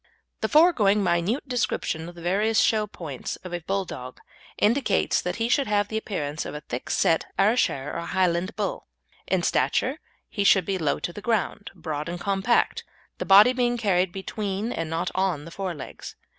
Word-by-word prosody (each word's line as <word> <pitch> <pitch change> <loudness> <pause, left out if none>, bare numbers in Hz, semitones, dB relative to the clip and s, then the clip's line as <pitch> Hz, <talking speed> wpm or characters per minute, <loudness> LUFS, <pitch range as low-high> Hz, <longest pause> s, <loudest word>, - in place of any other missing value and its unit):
The - - -1
foregoing 240 - +4
minute 185 +10 0
description 200 -9 -2
of 175 - -13
the 170 - -11
various 210 +5 +2
show 215 -1 +2
points 155 -9 -6
of 180 -1 -8
a 175 - -2
Bulldog 175 -8 -4 0.4
indicates 220 -2 +2
that 180 0 -3
he 230 0 -1
should 275 +3 +2
have 205 -1 +1
the 220 - -2
appearance 155 -9 -3
of - - -7
a 150 - -6
thick 125 -3 -6
set 165 - +2
Ayrshire 195 - +2
or 170 - -4
Highland 185 +1 0
bull. 205 -3 -3 0.4
In 185 -2 +1
stature 265 - +1 0.3
he 200 - -2
should 195 -2 +5
be 195 -1 -1
low 155 -3 +1
to 175 - -4
the 210 - -8
ground, 215 -2 -1
broad 155 -1 -4
and 175 0 -5
compact, 195 +5 +1 0.4
the - - -3
body 205 +6 +7
being 245 -1 +1
carried 190 -5 +1
between 200 +3 -3
and 165 -6 -3
not 165 +3 -2
on 185 -6 0
the 165 - -10
fore 185 -1 -4
legs. 140 - -9
195 Hz, 185 wpm, -25 LUFS, 170-215 Hz, 0.4 s, body